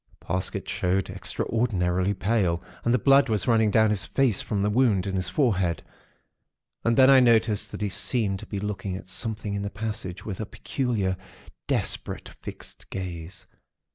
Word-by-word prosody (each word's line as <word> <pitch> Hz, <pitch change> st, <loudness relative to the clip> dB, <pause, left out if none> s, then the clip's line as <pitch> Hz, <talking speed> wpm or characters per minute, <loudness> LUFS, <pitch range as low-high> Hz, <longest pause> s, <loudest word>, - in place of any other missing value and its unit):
Parsket 90 Hz, +2 st, -3 dB
showed 95 Hz, +1 st, 0 dB
extraordinarily 95 Hz, -4 st, 0 dB
pale, 95 Hz, -5 st, 0 dB, 0.2 s
and 120 Hz, -, +2 dB
the 125 Hz, -, +4 dB
blood 135 Hz, 0 st, +5 dB
was 105 Hz, -4 st, 0 dB
running 110 Hz, -2 st, +4 dB
down 110 Hz, +1 st, +4 dB
his 100 Hz, -3 st, 0 dB
face 130 Hz, -7 st, +1 dB
from 100 Hz, -2 st, -2 dB
the 105 Hz, -, +2 dB
wound 105 Hz, -5 st, +3 dB
in 100 Hz, -, -3 dB
his 95 Hz, -1 st, -1 dB
forehead; 95 Hz, -, +1 dB, 1.0 s
and 115 Hz, 0 st, +2 dB
then 130 Hz, -1 st, +8 dB
I 135 Hz, -1 st, +8 dB
noticed 110 Hz, -4 st, +3 dB
that -, -, -7 dB
he 105 Hz, -, 0 dB
seemed 100 Hz, -1 st, 0 dB
to -, -, -9 dB
be 100 Hz, -, -4 dB
looking 100 Hz, -2 st, -3 dB
at 95 Hz, -, -11 dB
something 105 Hz, +1 st, -4 dB
in 100 Hz, -, -2 dB
the 100 Hz, -, -3 dB
passage 100 Hz, -4 st, -5 dB
with 95 Hz, -4 st, -5 dB
a 110 Hz, -, -2 dB
peculiar, 110 Hz, -10 st, -2 dB, 0.5 s
desperate, -, -, -1 dB
fixed -, -, -9 dB
gaze. 90 Hz, -1 st, -6 dB
105 Hz, 170 wpm, -26 LUFS, 95-115 Hz, 1.0 s, then